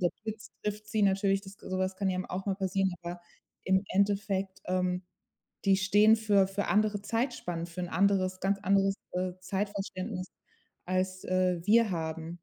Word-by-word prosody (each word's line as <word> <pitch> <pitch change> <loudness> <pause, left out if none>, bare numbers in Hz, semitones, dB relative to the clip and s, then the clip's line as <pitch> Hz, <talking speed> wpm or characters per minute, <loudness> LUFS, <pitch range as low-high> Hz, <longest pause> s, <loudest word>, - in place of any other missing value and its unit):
der 175 - +3 0.2
Blitz 220 -1 -6
trifft 210 0 -3
sie 215 0 +1
natürlich, 195 0 +3
das 195 +1 -12
ge - - -11
sowas 185 0 -1
kann 195 0 0
ja 185 - -1
m 185 - -2
auch 190 +2 -5
mal 195 - +1
passieren. 190 0 0
Aber 175 0 -6 0.4
im 190 +1 +3
Endeffekt, 195 -1 0
ähm, 180 0 0 0.6
die 195 -1 +6
stehen 205 +3 +5
für 205 -3 +3
für 200 +1 -2
andere 210 -1 +2
Zeitspannen, 205 -8 -2
für 175 +1 -7
'n 175 - -3
anderes 185 0 +2
ganz 195 +1 +1
anderes, 195 0 +3 0.2
äh, 180 0 -1
Zeitverständnis, 190 0 -3 0.6
als, 185 0 -1
äh, 185 -1 +1
wir 225 0 +5
haben. 165 0 -4
190 Hz, 170 wpm, -30 LUFS, 185-200 Hz, 0.6 s, die